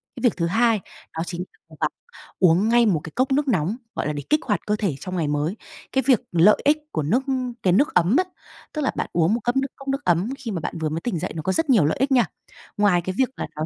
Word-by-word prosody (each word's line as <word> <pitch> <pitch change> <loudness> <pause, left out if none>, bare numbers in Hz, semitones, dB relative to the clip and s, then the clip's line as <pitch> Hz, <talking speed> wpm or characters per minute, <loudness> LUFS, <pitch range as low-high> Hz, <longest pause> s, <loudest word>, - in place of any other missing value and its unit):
Cái - - -8
việc 245 - +3
thứ 170 - 0
hai, 225 +4 +3 0.4
đó 165 - 0
chính 175 0 -4 0.3
cố 160 - -14
gắng 155 - +2 0.5
uống 185 +4 +4
ngay 235 0 +5
một 185 -8 +2
cái 160 - -8
cốc 255 +2 +1
nước 285 +2 +2
nóng, 185 - +1 0.2
gọi - - -2
là, 150 - -1
để 145 -1 -5
kích 305 - +4
hoạt 210 -7 -1
cơ 210 - +2
thể 200 -9 -1
trong 185 +5 -6
ngày 160 -3 0
mới, 150 +7 -1 0.3
cái 265 - +1
việc 255 -6 +5
lợi 175 +5 +5
ích 295 +1 +4
của 155 - -1
nước 225 - +1 0.4
cái 180 - +3
nước 280 +11 +3
ấm 180 +6 +3
á 370 - +4 0.5
tức 305 - -2
là 270 - +1
bạn - - -3
uống 170 +3 +3
một 235 - +1
ấm 240 +1 0
nước 270 - -1
cốc 275 - -13
nước 275 +1 -1
ấm 175 +5 +2
khi 245 -5 -6
mà 185 - -2
bạn 165 - -5
vừa 160 -1 -1
mới 160 +2 -3
tỉnh 190 -7 -2
dậy, - - -3
nó 160 - -3
có 190 - -1
rất 325 +4 0
nhiều 220 - +5
lợi 150 - 0
ích 270 +2 +1
nha. 245 -4 +5 0.5
Ngoài 200 -4 +3
cái 185 +2 -4
việc 260 -1 +2
là - - -3
nó 155 +1 -2
200 Hz, 280 wpm, -23 LUFS, 165-250 Hz, 0.5 s, ngay